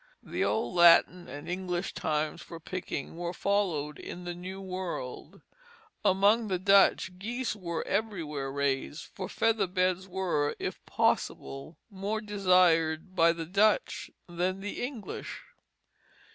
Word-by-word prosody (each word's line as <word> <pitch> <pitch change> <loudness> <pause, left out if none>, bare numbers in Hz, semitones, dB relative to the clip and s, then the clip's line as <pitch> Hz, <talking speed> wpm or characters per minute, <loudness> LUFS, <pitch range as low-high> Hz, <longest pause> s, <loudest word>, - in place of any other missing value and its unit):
The - - -2
old 220 - 0
Latin 175 +1 +6
and 145 +3 -8
English 180 0 -2
times 155 +1 -1
for 165 +1 -9
picking 165 -3 -5
were 175 0 -3
followed 175 -7 0
in 180 - -7
the 175 - -3
New 185 +2 -7
World. 185 -9 -6 0.6
Among 205 +4 +4
the 190 -2 0
Dutch, 190 -1 +4
geese 235 +4 -2
were 170 -5 -4
everywhere 155 -11 -2
raised; 140 +2 -1
for 190 - -7
feather 225 -3 +1
beds 185 0 0
were, 180 -6 0
if - - -5
possible, 135 +4 -1
more 200 +3 -2
desired 180 -5 +2
by 165 -2 +5
the 165 -1 -4
Dutch 200 +5 +2 0.2
than 180 +2 -2
the 205 - -5
English. 245 -5 -6
180 Hz, 130 wpm, -29 LUFS, 165-195 Hz, 0.6 s, Latin